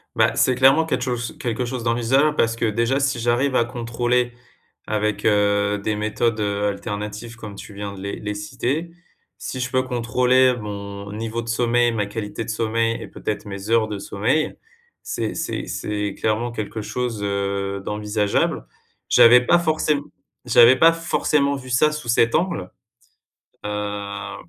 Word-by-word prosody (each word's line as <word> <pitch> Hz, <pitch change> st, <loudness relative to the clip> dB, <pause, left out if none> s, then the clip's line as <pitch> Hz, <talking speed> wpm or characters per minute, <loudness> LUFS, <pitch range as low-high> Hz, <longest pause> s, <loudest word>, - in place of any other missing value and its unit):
Bah, -, -, +3 dB
c'est 130 Hz, -, +3 dB
clairement 135 Hz, +5 st, +5 dB
quèt 160 Hz, -, -1 dB
chose 120 Hz, -2 st, -3 dB
quelque 120 Hz, 0 st, -2 dB
chose 120 Hz, -1 st, -4 dB
d'envisageable 125 Hz, +6 st, +2 dB
parce 115 Hz, 0 st, +2 dB
que -, -, -5 dB
déjà, 115 Hz, +5 st, +1 dB
si 135 Hz, -3 st, 0 dB
j'arrive 120 Hz, +4 st, +1 dB
à 120 Hz, -, +3 dB
contrôler 120 Hz, +1 st, -1 dB, 0.6 s
avec, 105 Hz, 0 st, -1 dB
heu, 100 Hz, -1 st, +2 dB
des 105 Hz, +1 st, -2 dB
méthodes, 110 Hz, +1 st, 0 dB
heu, 100 Hz, 0 st, 0 dB
alternatives 105 Hz, +3 st, -5 dB
comme 110 Hz, -3 st, -9 dB
tu 100 Hz, -, -10 dB
viens 100 Hz, 0 st, -5 dB
de 100 Hz, -, -10 dB
les 100 Hz, +1 st, -4 dB
les 105 Hz, 0 st, -3 dB
citer, 130 Hz, +10 st, -3 dB, 0.5 s
si 130 Hz, -, -5 dB
je 125 Hz, -, -2 dB
peux 130 Hz, 0 st, +1 dB
contrôler 125 Hz, +1 st, +2 dB
mon 100 Hz, -2 st, -7 dB
niveau 115 Hz, +2 st, -3 dB
de 115 Hz, -, -8 dB
sommeil, 120 Hz, +1 st, +2 dB
ma 110 Hz, -3 st, -1 dB
qualité 105 Hz, +1 st, -5 dB
de -, -, -8 dB
sommeil 115 Hz, +1 st, 0 dB
et -, -, -8 dB
peut-être 105 Hz, -1 st, -4 dB
mes 100 Hz, 0 st, -7 dB
heures 115 Hz, -1 st, +3 dB
de 105 Hz, -2 st, -4 dB
sommeil, 120 Hz, +13 st, 0 dB, 0.5 s
c'est -, -, -3 dB
c'est -, -, -3 dB
c'est 105 Hz, -1 st, -3 dB
clairement 115 Hz, +2 st, -1 dB
quelque 110 Hz, 0 st, -4 dB
chose, 115 Hz, -1 st, -3 dB
heu, 100 Hz, 0 st, -2 dB
d'envisageable. 105 Hz, -, -1 dB, 0.4 s
J'avais 120 Hz, +1 st, +7 dB
pas 175 Hz, +5 st, +5 dB
forcém 155 Hz, -3 st, +1 dB, 0.4 s
j'avais 120 Hz, +1 st, +7 dB
pas 165 Hz, +4 st, +6 dB
forcément 150 Hz, -4 st, +1 dB
vu 130 Hz, -2 st, -9 dB
ça 130 Hz, +5 st, +3 dB
sous 150 Hz, -5 st, -6 dB
cet 115 Hz, 0 st, +3 dB
angle. 165 Hz, -, -1 dB, 0.9 s
Heu, 100 Hz, -1 st, -4 dB
115 Hz, 160 wpm, -22 LUFS, 105-125 Hz, 0.9 s, J'avais